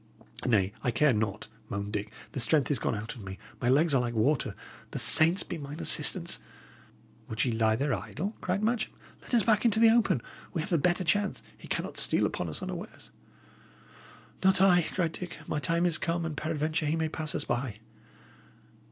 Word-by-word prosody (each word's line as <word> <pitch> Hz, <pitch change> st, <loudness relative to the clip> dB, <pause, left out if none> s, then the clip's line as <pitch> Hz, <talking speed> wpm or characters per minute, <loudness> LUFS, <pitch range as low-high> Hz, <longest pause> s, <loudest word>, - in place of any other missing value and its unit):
"Nay, 100 Hz, -4 st, +2 dB
I 120 Hz, -, 0 dB
care 130 Hz, +4 st, +3 dB
not," 105 Hz, -3 st, -2 dB, 0.2 s
moaned 100 Hz, +1 st, -4 dB
Dick; 105 Hz, 0 st, -3 dB, 0.2 s
"the 140 Hz, -, -4 dB
strength 145 Hz, +3 st, +2 dB
is 140 Hz, -, +1 dB
gone -, -, -1 dB
out 110 Hz, +2 st, -5 dB
of 120 Hz, -, -11 dB
me; 95 Hz, 0 st, -7 dB, 0.2 s
my 120 Hz, -, +1 dB
legs 150 Hz, +4 st, +4 dB
are 130 Hz, -, +3 dB
like 120 Hz, -1 st, -3 dB
water. 130 Hz, +6 st, +1 dB, 0.3 s
The -, -, -6 dB
saints 165 Hz, +4 st, +5 dB
be 170 Hz, -, -6 dB
mine 145 Hz, +1 st, -8 dB
assistance!" -, -, +3 dB, 0.9 s
"Would 110 Hz, +2 st, 0 dB
ye 125 Hz, -, 0 dB
lie 110 Hz, -1 st, +2 dB
there 135 Hz, +3 st, 0 dB
idle?" 175 Hz, -, -4 dB
cried 185 Hz, +3 st, -1 dB
Matcham. 230 Hz, 0 st, 0 dB, 0.3 s
"Let -, -, -2 dB
us 230 Hz, -, +4 dB
back 220 Hz, -3 st, +2 dB
into 225 Hz, -2 st, +3 dB
the 225 Hz, 0 st, +7 dB
open. 225 Hz, -, +2 dB, 0.3 s
We 165 Hz, -, 0 dB
have 165 Hz, -, -6 dB
the 170 Hz, -, +3 dB
better 175 Hz, +4 st, +1 dB
chance; 205 Hz, +3 st, 0 dB
he -, -, -14 dB
cannot -, -, -2 dB
steal -, -, +5 dB
upon -, -, -3 dB
us -, -, -4 dB
unawares." -, -, -7 dB, 1.3 s
"Not 190 Hz, 0 st, +4 dB
I," 185 Hz, -2 st, +5 dB
said 170 Hz, 0 st, -2 dB
Dick. 180 Hz, +1 st, -7 dB
"My 150 Hz, -, -2 dB
time 165 Hz, +5 st, 0 dB
is 170 Hz, -3 st, +1 dB
come, 170 Hz, 0 st, -1 dB
and 160 Hz, -2 st, -4 dB
peradventure 155 Hz, 0 st, -2 dB
he 155 Hz, -, +1 dB
may 160 Hz, -1 st, 0 dB
pass 155 Hz, -1 st, -2 dB
us -, -, -1 dB
by." 120 Hz, -3 st, -2 dB
155 Hz, 195 wpm, -29 LUFS, 120-175 Hz, 1.3 s, the